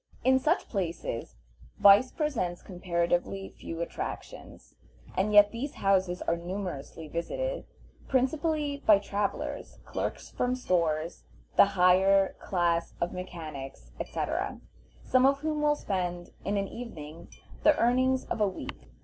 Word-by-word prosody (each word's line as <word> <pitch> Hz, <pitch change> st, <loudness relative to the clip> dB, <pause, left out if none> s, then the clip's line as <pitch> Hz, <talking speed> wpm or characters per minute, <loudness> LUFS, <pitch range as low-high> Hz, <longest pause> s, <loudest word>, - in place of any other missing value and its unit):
In 260 Hz, 0 st, +5 dB
such 315 Hz, +6 st, +1 dB
places 170 Hz, -, -3 dB, 0.4 s
vice 205 Hz, +6 st, +7 dB
presents 235 Hz, -, -2 dB
comparatively 175 Hz, +1 st, -1 dB
few 165 Hz, 0 st, -5 dB
attractions, 170 Hz, -, -7 dB, 0.4 s
and 200 Hz, +3 st, +1 dB
yet 205 Hz, 0 st, +7 dB
these 260 Hz, +5 st, -5 dB
houses 190 Hz, -2 st, +1 dB
are 170 Hz, -, +1 dB
numerously 170 Hz, -3 st, -5 dB
visited, -, -, -3 dB, 0.4 s
principally 285 Hz, +2 st, 0 dB
by 210 Hz, -2 st, +8 dB
travelers, 200 Hz, 0 st, -3 dB
clerks -, -, -4 dB
from 250 Hz, 0 st, 0 dB
stores, 170 Hz, -8 st, -1 dB, 0.3 s
the -, -, +8 dB
higher 190 Hz, +2 st, +5 dB
class 170 Hz, -2 st, 0 dB
of 170 Hz, -, -1 dB
mechanics, 155 Hz, -, -7 dB
etc., -, -, -2 dB, 0.4 s
some 255 Hz, +1 st, +4 dB
of 275 Hz, 0 st, +2 dB
whom 305 Hz, -1 st, -1 dB
will 295 Hz, 0 st, +3 dB
spend 175 Hz, -7 st, -3 dB
in 200 Hz, +1 st, -1 dB
an 195 Hz, 0 st, 0 dB
evening 170 Hz, -9 st, -9 dB, 0.3 s
the 305 Hz, -1 st, +5 dB
earnings 255 Hz, +2 st, +2 dB
of -, -, -3 dB
a 210 Hz, -, +4 dB
week. 65 Hz, -, -7 dB
195 Hz, 125 wpm, -29 LUFS, 170-255 Hz, 0.4 s, by